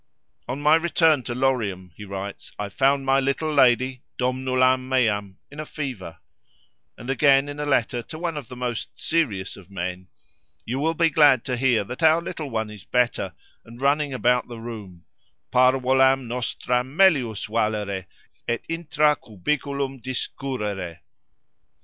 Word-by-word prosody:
—"On 130 +3 -3
my 150 +1 +4
return 160 -3 +3
to 120 - -4
Lorium," 110 -9 -1
he 105 - -10
writes, 100 0 -7
"I 105 -1 -4
found 135 +5 +2
my 135 0 +4
little 140 +3 -1
lady—domnulam 130 0 +2
meam—in 110 +1 -1
a - - -2
fever;" 115 - -6 0.8
and 120 - -10
again, 135 +1 +4
in 145 0 -7
a 150 - -2
letter 120 -3 +1
to 155 - -10
one 170 -1 -3
of 145 -6 -6
the 125 - -9
most 125 -2 -4
serious 110 - 0
of 100 -1 -15
men, 90 -1 -5 0.6
"You 125 +4 -2
will 160 +3 0
be 165 0 +3
glad 145 -5 +5
to 125 - -1
hear 120 -4 +2
that 125 +8 -8
our 160 0 +5
little 160 -3 -6
one 110 -3 -2
is 105 -3 -10
better, 120 -7 0 0.3
and 115 +1 -13
running 140 +1 +1
about 125 -1 +1
the 120 -1 -8
room—parvolam 120 - 0
nostram 125 +3 -2
melius 140 - +3
valere 105 -4 -1 0.4
et 120 0 -1
intra 155 -2 +1
cubiculum 135 +5 -3
discurrere." 105 -8 -4
125 Hz, 145 wpm, -24 LUFS, 110-140 Hz, 0.8 s, glad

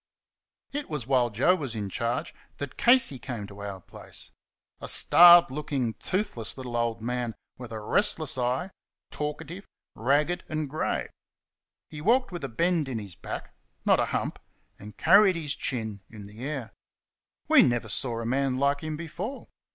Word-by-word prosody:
It 290 +1 -4
was 150 -6 -4
while 125 -2 +2
Joe 120 - +3
was 140 -10 -4
in 105 -2 -3
charge 115 +5 -2 0.2
that 145 -1 -6
Casey 240 - +4
came 115 -4 -5
to 100 0 -12
our 100 -2 -6
place. - - -10 0.5
A - - -7
starved 175 -3 +8
looking, 135 -5 -2
toothless 135 - -3
little 125 -2 -6
old 115 -1 -1
man 120 -1 -2 0.2
with 120 -2 -8
a 110 - -5
restless 155 - +1
eye, 130 +9 -1 0.4
talkative, 160 +5 -5 0.3
ragged 145 +8 +1
and 155 -1 -2
grey; 155 +3 -2 0.8
he 150 -1 -7
walked 245 - +2
with 175 -3 -6
a 135 - -3
bend 160 +4 0
in 125 - -3
his 100 -4 -6
back - - -7 0.3
(not - - +4
a - - +2
hump), - - -3 0.4
and 105 0 -11
carried 195 +2 +6
his 155 -3 -3
chin 110 -6 -4
in 105 -3 -10
the 105 +4 -11
air. 135 -5 -4 0.7
We - - +7
never 120 -2 +1
saw 115 +3 -2
a - - -5
man 130 +1 0
like 140 +1 +1
him 155 -1 -4
before. 180 - -6
135 Hz, 165 wpm, -27 LUFS, 115-160 Hz, 0.8 s, starved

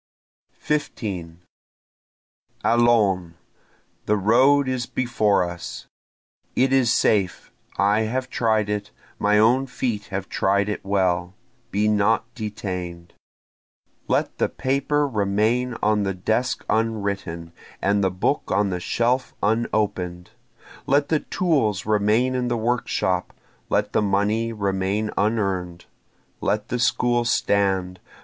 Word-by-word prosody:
15 95 - -4 1.2
Allons! 105 -8 +3 0.7
the 105 - +3
road 130 +7 +4
is 130 -2 -2
before 110 -6 +1
us! 85 -1 -6 0.7
It 130 +1 +2
is 130 -4 +4
safe 100 -6 +1 0.3
I 100 +3 +3
have 130 +2 -2
tried 110 -3 +1
it 105 0 -3 0.3
my 105 +1 +3
own 125 +5 +4
feet 120 -5 -3
have 95 -1 -5
tried 100 +1 +1
it 105 - -4
well 95 -2 0 0.3
be 105 -1 +1
not 105 +1 +2
detain'd! 90 -6 -6 0.9
Let - - 0
the - - +2
paper 140 +2 0
remain 110 +2 0
on 105 0 +3
the 95 -2 -1
desk 110 +7 -1
unwritten, 100 -7 -2 0.3
and 100 +1 +1
the 95 - +3
book 95 +10 -1
on 100 -2 +2
the 90 - -2
shelf 120 +7 0
unopen'd! 105 -5 -1 0.6
Let 140 +1 +2
the 155 - +2
tools 135 - 0
remain 110 +4 +2
in 125 -1 -1
the 120 -1 0
workshop! 110 -6 -1 0.3
let - - 0
the - - +3
money 105 +3 +1
remain 100 0 -1
unearn'd! 95 -5 -1 0.6
Let 105 0 -1
the 125 - -1
school 120 0 +2
stand! 95 -5 +1
105 Hz, 115 wpm, -23 LUFS, 95-120 Hz, 1.2 s, road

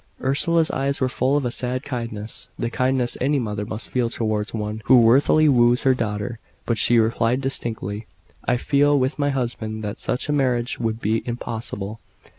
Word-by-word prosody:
Ursula's 160 +5 +2
eyes 140 +1 -1
were 130 - +2
full 130 +2 +1
of 145 - -1
a 120 - 0
sad 125 +2 -2
kindness 115 -5 -5
the 120 - -2
kindness 130 -1 0
any 140 +3 +2
mother 105 -4 -3
must 110 -1 -5
feel 125 -2 0
towards 110 -2 -2
one 105 0 -4
who 130 - +7
worthily 135 +6 +5
woos 120 -3 +4
her 135 - +5
daughter 110 -1 -3 0.3
but 115 -3 0
she 120 - +4
replied 115 +2 +2
distinctly 110 -5 -3 0.4
"I 125 - +1
feel, 145 +3 +3
with 130 +3 0
my 145 0 +2
husband, 115 -5 -3
that 105 -1 -5
such 125 - -2
a 150 - 0
marriage 125 -4 0
would 115 -1 -2
be 110 +2 +1
impossible." 115 -3 -5
120 Hz, 180 wpm, -23 LUFS, 110-135 Hz, 0.4 s, who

